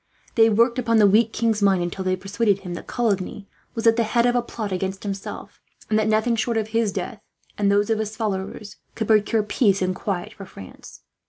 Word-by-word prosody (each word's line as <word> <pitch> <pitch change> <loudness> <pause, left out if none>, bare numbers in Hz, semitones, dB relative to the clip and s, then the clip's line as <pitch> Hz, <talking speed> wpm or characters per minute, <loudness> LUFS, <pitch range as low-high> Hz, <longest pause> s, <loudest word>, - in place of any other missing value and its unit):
They 225 -1 +5
worked 235 +3 +3
upon 230 -2 +2
the 215 - +6
weak 220 +3 +4
king's 225 -2 0
mind, 195 -3 +3
until 175 +2 -4
they 185 0 +1
persuaded 200 +2 0
him 180 -2 -6
that 175 - -8
Coligny 205 -3 -2 0.3
was 225 0 -3
at 230 0 +5
the 230 - +3
head 235 +2 +1
of 245 0 +2
a 245 - +3
plot 220 -3 -6
against 190 +1 -3
himself; 195 -1 -7 0.3
and 215 - +3
that 215 - +1
nothing 220 +2 +2
short 230 +1 -1
of 220 -1 -2
his 225 -2 +1
death, - - -5 0.3
and 200 -1 +1
those 205 +2 +2
of 220 - +1
his 215 0 -3
followers, 205 -1 -4 0.2
could 220 - -2
procure 215 0 +3
peace 205 -1 +2
and 185 0 0
quiet 200 +2 -4
for 195 -2 -11
France. 95 - -13
210 Hz, 220 wpm, -23 LUFS, 195-225 Hz, 0.3 s, the